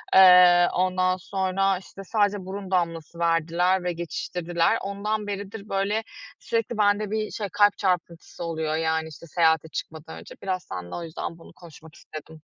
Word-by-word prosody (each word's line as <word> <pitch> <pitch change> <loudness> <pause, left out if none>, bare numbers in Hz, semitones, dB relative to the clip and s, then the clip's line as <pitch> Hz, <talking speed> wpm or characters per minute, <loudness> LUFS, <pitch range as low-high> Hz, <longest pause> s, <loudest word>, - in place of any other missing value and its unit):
Eee, 180 -2 +8
ondan 185 0 +1
sonra, 195 +1 0
işte, 195 +1 -11
sadece 205 -1 0
burun 195 0 -7
damlası 170 -2 -2
verdiler 170 +2 +1
ve 180 0 -1
geçiştirdiler. 170 +2 -1
Ondan 205 +2 -3
beridir, 205 +1 -6
böyle, 200 +3 0 0.4
sürekli 230 0 -2
bende 205 0 +2
bir 215 0 -2
şey, 205 -3 -4
kalp 205 0 +4
çarpıntısı 175 -3 -2
oluyor, 160 -2 -2
yani, 160 0 0
işte, 160 +2 -12
seyahate 160 -1 +2
çıkmadan 160 0 -7
önce. - - -12
Biraz 185 -2 -2
senle 90 -2 -7
o 175 - -5
yüzden 165 0 -6
bunu 165 - -15
konuşmak 160 -2 -15
istedim. 155 +1 -11
180 Hz, 155 wpm, -25 LUFS, 165-200 Hz, 0.4 s, Eee